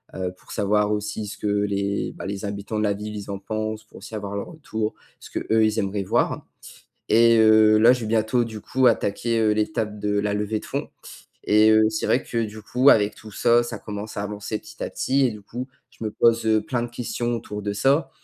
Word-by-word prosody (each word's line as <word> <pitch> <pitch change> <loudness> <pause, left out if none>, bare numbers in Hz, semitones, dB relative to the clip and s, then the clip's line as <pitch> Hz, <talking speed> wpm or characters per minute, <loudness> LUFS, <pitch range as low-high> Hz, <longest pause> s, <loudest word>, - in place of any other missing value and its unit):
heu, 90 -1 -3
pour - - -16
savoir 105 0 +1
aussi 105 +1 -2
ce - - -7
que - - -2
les, 100 -1 -1
bah, - - -8
les 100 0 -5
habitants 100 +2 -4
de 105 - 0
la 100 - +2
ville, 105 +1 -6
ils 100 0 -7
en 100 - -4
pensent, 110 +1 -4
pour - - -16
aussi - - -11
avoir 100 -1 -5
leur 100 - -4
retour, 110 -9 -4 0.3
ce - - -12
que, - - -2
eux, 110 0 +5
ils 110 0 0
aimeraient 100 -1 -1
voir - - 0 0.7
et 115 0 +6
heu, 110 0 +6
là, 115 +3 +7
je 125 -2 -2
vais - - -3
bientôt, 110 +2 +1
du 110 -2 -7
coup, 130 +4 +1
attaquer, 115 +1 +1
heu, 110 -1 +3
l'étape 105 -1 -1
de 105 0 -1
la 105 0 -1
levée 105 +1 -1
de - - -13
fond - - -4 0.6
et 105 +1 +5
heu, 110 0 +5
c'est 110 - -2
vrai 125 - +2
que 115 -1 -2
du 110 0 -7
coup, 130 +5 +4
avec 105 -4 +4
tout 110 -1 -12
ça, 120 +4 +3
ça 120 -2 -5
commence 105 0 -7
à - - -1
avancer 105 +1 -4
petit 105 0 -9
à - - -3
petit 135 +1 +1
et 125 - +1
du 105 -1 -10
coup, 125 +6 -6 0.2
je - - -11
me 110 - -1
pose, 115 +1 +3
heu, 110 -1 +3
plein 120 -3 -2
de 120 - -5
questions 120 0 -3
autour 105 -2 -6
de 100 0 -2
ça 135 +8 +2
110 Hz, 240 wpm, -23 LUFS, 105-115 Hz, 0.7 s, là